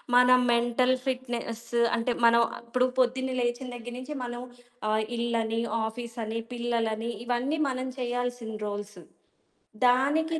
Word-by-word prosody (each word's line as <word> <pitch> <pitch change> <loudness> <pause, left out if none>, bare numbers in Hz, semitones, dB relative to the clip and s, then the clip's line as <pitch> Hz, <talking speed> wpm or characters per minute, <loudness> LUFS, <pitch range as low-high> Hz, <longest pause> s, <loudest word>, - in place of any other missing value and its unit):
మన 250 0 +7 0.2
mental 240 +2 +3
fitness 240 -3 -3 0.3
అంటే, 230 +2 0
మనం 235 0 +6
ఆహ్, - - -8
ఇప్పుడు 250 +2 +2
పొద్దున్నే 260 +1 +1
లేచిన 240 +1 -1
దగ్గర 240 0 -7
నుంచి 295 +4 -6
మనం 240 0 -4 0.5
ఆహ్, 215 0 +2
ఇల్లని, 230 -1 0 0.2
ఆఫీసని 230 0 -4
పిల్లలని, 235 -2 -1
ఇవన్నీ 245 +5 0
మనం 255 0 -2
చెయ్యాల్సిన 245 -2 -2
రోల్స్. 205 -2 -5 0.9
దానికి 300 +6 +3
240 Hz, 120 wpm, -28 LUFS, 230-255 Hz, 0.9 s, మన